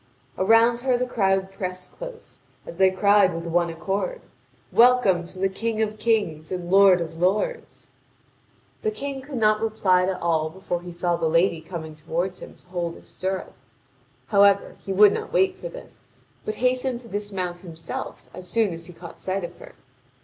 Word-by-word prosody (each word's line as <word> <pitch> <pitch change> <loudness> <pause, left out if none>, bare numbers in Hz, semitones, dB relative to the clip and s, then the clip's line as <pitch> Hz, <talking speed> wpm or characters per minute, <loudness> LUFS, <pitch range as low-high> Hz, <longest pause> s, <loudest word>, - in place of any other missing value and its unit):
Around 225 +4 +4
her 250 0 +1
the 250 - 0
crowd 195 -5 +1
pressed 185 -1 -6
close, - - -10 0.3
as 170 - -9
they 190 0 +5
cried 200 -1 +4
with 165 - -4
one 170 0 +1
accord: 195 - -3 0.5
"Welcome 230 -8 +4
to 185 - -12
the 195 +1 +2
King 220 +3 -3
of 215 -1 -1
kings 205 -9 0
and 180 -1 -4
lord 195 -2 +6
of 165 0 -6
lords!" 210 - -1 0.9
The 435 - +1
King 280 -10 -5
could 270 0 -7
not 215 -1 +3
reply 190 -5 +2
to 190 -1 -2
all 160 -2 +1
before 175 0 -4
he 175 0 -8
saw 175 0 0
the 165 -1 0
lady 165 0 +2
coming 160 -2 -7
toward 170 +4 -3
him - - -11
to - - -24
hold 175 -2 -3
his - - -15
stirrup. 190 0 -4 0.8
However, 200 -1 +4
he 195 - -4
would 205 +1 +6
not - - -4
wait 380 -1 +2
for - - -7
this, - - -13 0.4
but 215 - -3
hastened 250 0 0
to 235 - -12
dismount 195 -4 -4
himself 165 -3 -7
as 180 - -8
soon 220 -4 +1
as 165 0 -8
he 180 - -11
caught 170 0 -12
sight 190 0 -2
of 175 0 -6
her. - - -13
190 Hz, 180 wpm, -24 LUFS, 175-225 Hz, 0.9 s, lord